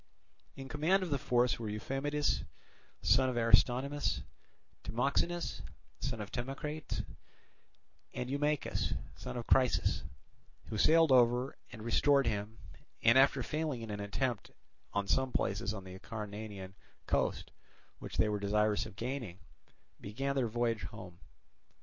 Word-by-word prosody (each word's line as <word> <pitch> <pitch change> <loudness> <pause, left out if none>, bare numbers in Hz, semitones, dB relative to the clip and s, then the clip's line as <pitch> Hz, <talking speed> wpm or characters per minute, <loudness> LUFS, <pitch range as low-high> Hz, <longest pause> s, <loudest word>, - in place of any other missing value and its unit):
In 135 0 -8
command 160 +8 +2
of 175 - -4
the 140 - +1
force 125 -1 +2
were 110 -2 -4
Euphamidas, 135 +7 -1 0.6
son 130 +2 +4
of 125 - -3
Aristonymus, 125 +5 +3 0.6
Timoxenus, 140 +8 0 0.4
son 125 -5 -3
of 100 - -7
Timocrates, 145 +5 -4 1.1
and 125 - -4
Eumachus, 145 +2 0 0.2
son - - -6
of 120 - -4
Chrysis, 130 -2 +3 0.7
who 110 - -3
sailed 165 +2 +5
over 125 +1 +4 0.2
and 110 - -9
restored 140 +4 +4
him 110 0 -2 0.5
and, 115 +2 +6
after 135 0 +5
failing 150 -4 -2
in 110 - -6
an 105 - -4
attempt 115 +3 -2 0.4
on 100 0 0
some 130 +4 +2
places 105 +1 0
on 100 -3 -6
the 95 -1 -9
Acarnanian 105 -3 -7 0.3
coast - - 0 0.5
which - - -7
they 110 - +4
were 105 -1 -1
desirous 105 +1 +1
of - - -13
gaining, 120 -5 -4 0.6
began 135 +7 -2
their 130 -3 +2
voyage 115 0 0
home. 90 -5 -9
120 Hz, 130 wpm, -33 LUFS, 105-140 Hz, 1.1 s, and